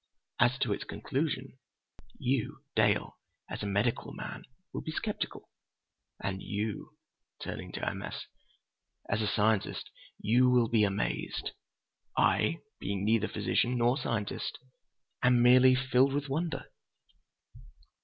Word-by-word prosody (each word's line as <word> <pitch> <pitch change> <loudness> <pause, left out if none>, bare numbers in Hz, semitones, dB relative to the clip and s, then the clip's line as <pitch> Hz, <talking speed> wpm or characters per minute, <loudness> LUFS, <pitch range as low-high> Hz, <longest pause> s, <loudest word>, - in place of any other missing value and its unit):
"As 120 +2 +4
to - - +1
its - - -4
conclusion, 135 -2 -3 0.6
you, 130 +1 -1
Dale, 105 -2 +2 0.3
as - - -5
a 105 - -2
medical 105 +4 0
man, - - -7 0.3
will - - -3
be 160 - -5
sceptical. 210 +5 -4 0.7
And 95 -1 -3
you"—turning 105 +1 -6
to - - -3
M. - - -2
S.—"as 105 +2 -7
a 105 - +1
scientist 105 0 +1 0.3
you 125 +4 +4
will 120 -2 +4
be 110 -2 +4
amazed. 100 0 -1 0.7
I, 165 +2 +3 0.2
being 100 0 -2
neither 110 0 +3
physician 120 +4 +1
nor 120 +1 +3
scientist, 115 -6 -2 0.6
am 125 -1 +5
merely 130 +1 +7
filled 130 +1 +3
with 145 0 -1
wonder!" 155 +2 -1
120 Hz, 115 wpm, -31 LUFS, 105-130 Hz, 0.7 s, merely